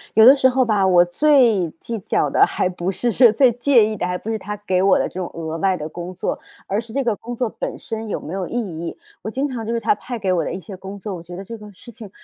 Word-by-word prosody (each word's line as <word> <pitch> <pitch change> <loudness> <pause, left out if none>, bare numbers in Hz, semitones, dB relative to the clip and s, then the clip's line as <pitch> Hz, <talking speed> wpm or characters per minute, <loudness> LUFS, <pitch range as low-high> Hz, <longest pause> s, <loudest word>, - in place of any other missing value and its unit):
有 220 +1 +8
的 265 +3 +10
时 260 -2 +4
候 260 0 +2
吧， 210 -4 +2
我 175 -2 +5
最 230 - +3
计 230 -1 -5
较 195 - 0
的， - - +3
还 - - -1
不 180 0 -3
是 240 +5 -1
说 240 +1 +6
最 250 +3 +4
介 245 -1 +4
意 215 0 -3
的 180 - -2
还 180 0 -2
不 220 - -5
是 220 - -2
他 210 +2 -6
给 185 -2 +1
我 195 0 +4
的 - - 0
这 - - -14
种 180 - -3
额 160 -1 -4
外 190 0 +1
的 150 -1 -5
工 175 +3 -7
作， 185 - -3 0.3
而 200 +3 -1
是 230 -1 -13
这 275 +4 -1
个 230 -4 0
工 240 +1 -7
作 245 0 -1
本 - - -3
身 225 0 -6
有 - - -2
没 160 - -8
有 190 -2 -3
意 - - -9
义。 170 -8 -4 0.2
我 215 - -5
经 265 +6 -1
常 250 -5 -5
就 - - -2
是 235 - 0
他 230 - +2
派 245 +4 -6
给 195 -4 0
我 175 - +1
的 - - -3
一 185 - -4
些 195 +1 -10
工 195 +2 -9
作， 200 +1 -6
我 175 - -7
觉 175 +1 -10
得 190 - -7
这 230 - -7
个 210 0 -11
事 235 - -13
情 215 -2 -11
210 Hz, 325 characters per minute, -21 LUFS, 185-235 Hz, 0.3 s, 的